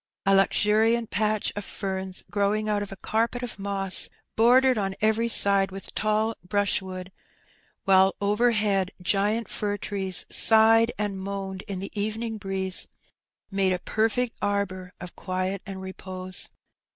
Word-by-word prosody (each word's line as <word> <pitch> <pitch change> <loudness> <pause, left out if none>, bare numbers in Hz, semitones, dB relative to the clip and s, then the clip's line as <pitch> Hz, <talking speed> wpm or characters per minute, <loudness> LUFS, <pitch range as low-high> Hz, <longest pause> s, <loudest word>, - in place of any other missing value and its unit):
A 195 - +4
luxuriant 215 +4 +2
patch 215 +1 0
of 205 - -4
ferns 190 -1 -4
growing 210 +1 0
out 210 -1 0
of 205 - -6
a - - -6
carpet 230 +5 -1
of 240 -4 -6
moss, 195 -1 +3 0.3
bordered 255 +3 +5
on 195 -3 -2
every 220 +2 +2
side 200 -3 +5
with 195 0 -9
tall 215 +1 0
brushwood, 190 -1 -2 0.7
while 190 0 +4
overhead 210 -2 +1
giant 205 +5 0
fir 205 -1 -2
trees 195 -2 -3
sighed 225 +1 +4
and 205 -2 -2
moaned 195 -1 -5
in 200 -2 -4
the 195 +2 -6
evening 220 +2 -3
breeze, 190 -1 -2 0.6
made 195 -1 +2
a - - 0
perfect 225 +5 -1
arbour 195 -3 -2
of 180 0 -9
quiet 185 +1 -3
and 190 -1 -7
repose. 185 -1 -4
200 Hz, 140 wpm, -26 LUFS, 190-215 Hz, 0.7 s, bordered